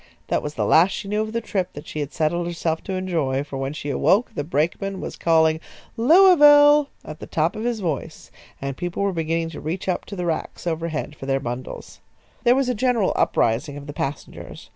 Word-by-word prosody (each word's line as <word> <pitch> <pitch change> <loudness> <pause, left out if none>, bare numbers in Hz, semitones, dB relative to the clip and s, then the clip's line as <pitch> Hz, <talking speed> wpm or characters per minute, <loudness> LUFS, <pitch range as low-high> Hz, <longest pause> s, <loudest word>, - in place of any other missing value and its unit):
That - - +1
was 150 0 -6
the - - 0
last 170 +4 +5
she 200 - -5
knew 210 +1 0
of 215 0 -3
the 230 +1 -2
trip 190 -4 -3
that 145 - -9
she 155 - -6
had 145 -1 -3
settled 170 +2 -1
herself 165 -2 -2
to 190 - -4
enjoy, 160 -8 -1
for 145 -2 -7
when 135 0 -3
she 145 -1 -5
awoke 200 - +2
the 145 - -3
brakeman 175 +6 -1
was - - -6
calling 160 -1 +3 0.4
"Louisville!" 295 0 +6 0.2
at 155 0 -8
the - - -8
top 160 +2 0
of 215 +2 -4
his 235 -3 -1
voice, 160 -7 -4 0.3
and 140 -1 -4
people 175 +6 -3
were 200 -1 0
beginning 165 0 -1
to 150 - -8
reach 170 +5 -4
up 185 - -1
to 200 - -8
the 180 -2 -3
racks 165 0 -3
overhead 160 -3 -3
for 135 - -9
their 135 0 +1
bundles. 120 0 -7 0.5
There 240 +1 +6
was 270 -1 +1
a 250 - +1
general 235 -3 +1
uprising 135 +6 +1
of 145 - -9
the 145 - -7
passengers. 140 0 -6
165 Hz, 215 wpm, -22 LUFS, 150-205 Hz, 0.5 s, Louisville